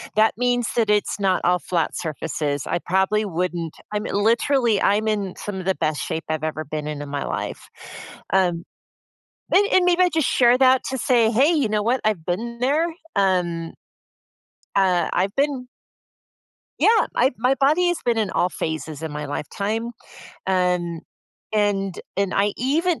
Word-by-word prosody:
that 215 +1 +4
means 245 -2 +1
that 225 -3 +1
it's 210 0 +1
not 190 -2 +1
all 180 0 +3
flat 170 -2 -1
surfaces. 150 -3 -3
I - - -1
probably 190 +5 +1
wouldn't 175 -3 -3 0.2
I'm, 210 +1 -2
eh, - - -4
literally, 230 +1 +2
I'm 210 +2 +2
in 205 -4 -1
some 205 -2 -5
of 185 - -6
the 190 0 +1
best 155 -2 -1
shape 160 - -3
I've 155 -1 -2
ever 155 0 -2
been 150 0 -5
in 150 -1 -4
in 145 - -7
my 140 -1 -3
life, - - -5 0.7
um, 175 -3 +2 0.9
an 400 - +6
and 370 - +5
maybe 360 0 +4
I 360 - +4
just 320 -5 +1
share 245 0 +4
that 260 -1 +5
to 265 - -3
say, 235 -2 +3
"Hey, 265 +7 +4
you 285 -9 +1
know 210 0 0
what? 240 +4 +1
I've 205 -7 0
been 235 +7 -3
there." 295 +6 +2 0.3
Um, 175 -4 0 1.0
uh, 185 -3 +2
I've 190 +3 0
been 275 -3 0 1.1
Yeah! 445 0 +4
I 255 +3 +3
my 250 +4 +2
body 310 +6 +3
has 350 - 0
been 235 -2 +1
in 210 -3 0
all 180 - +1
phases 160 -2 -4
in 160 - -4
my 150 0 -5
lifetime, 210 +10 -3 0.6
um, 180 -3 0 0.5
and 200 -3 0 0.2
and 200 -1 0
I 200 +1 +2
even 320 +7 0
205 Hz, 170 wpm, -22 LUFS, 175-245 Hz, 1.1 s, an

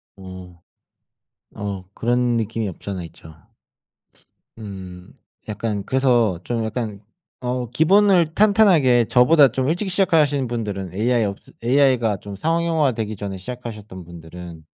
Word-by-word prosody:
어. 95 -3 -11 1.0
어 100 -2 -5
그런 120 0 0
느낌이 115 0 -2
없잖아 95 +1 -6
있죠. 80 -1 -14 1.2
음. 95 -4 -10 0.3
약간 105 -1 -3
그래서 120 -8 +2
좀 115 -2 -2
약간 110 -2 -4 0.4
어 125 0 -3
기본을 175 +2 +3
탄탄하게 180 - +4
저보다 140 +5 +5
좀 130 +3 -2
일찍 185 +4 -1
시작하시는 155 -8 +2
분들은 100 -6 -4
AI 115 +3 +1
없으 100 -1 -7
AI가 125 -4 +2
좀 100 +1 -9
상용화 165 - +1
되기 110 -2 -4
전에 100 -1 -6
시작하셨던 105 -4 -8
분들은 85 0 -11
115 Hz, 270 characters per minute, -21 LUFS, 100-135 Hz, 1.2 s, 저보다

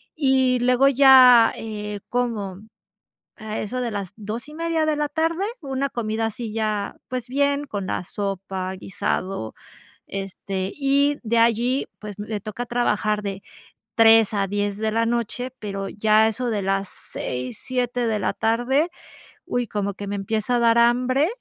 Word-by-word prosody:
y 260 -4 +3
luego 250 +2 +4
ya, 255 -4 +7
eh, 210 -2 -6
como, 215 -6 -2 0.8
a 215 -2 -5
eso 250 +4 -3
de 235 -2 -2
las 200 -2 -5
2:30 300 +10 -2
de 305 - +2
la 295 -1 -1
tarde, 330 +5 0 0.2
una 275 0 -2
comida 225 -1 -2
así 225 0 -5
ya, 215 -2 -2
pues, 250 -1 -4
bien, 285 +1 +1
con 205 -7 -4
la - - -2
sopa, 195 -1 -4
guisado, 185 - -3 0.5
este, 195 0 -4
y 280 +1 +2
de 230 0 +1
allí, 235 +3 +2
pues, 210 -1 -8
me 210 0 -4
toca 215 +4 -6
trabajar 215 -3 0
de 195 -1 -5 0.5
3 225 -1 +6
a 200 -1 +1
10 205 0 -1
de 220 0 -1
la 230 +1 +2
noche, 235 +1 -2
pero 195 -2 -4
ya 215 +1 +3
a - - +4
eso 240 +3 -2
de 210 -3 -1
las 195 0 0
6, 125 -1 -5
7 245 -1 -1
de 215 -1 0
la 185 - 0
tarde, 245 +8 +1 0.6
uy, 245 -1 -1
como 200 -2 -3
que 200 - -6
me 205 - -3
empieza 215 +4 -1
a - - +1
dar 230 0 +4
hambre, 250 +5 +3
225 Hz, 160 wpm, -23 LUFS, 205-255 Hz, 0.8 s, ya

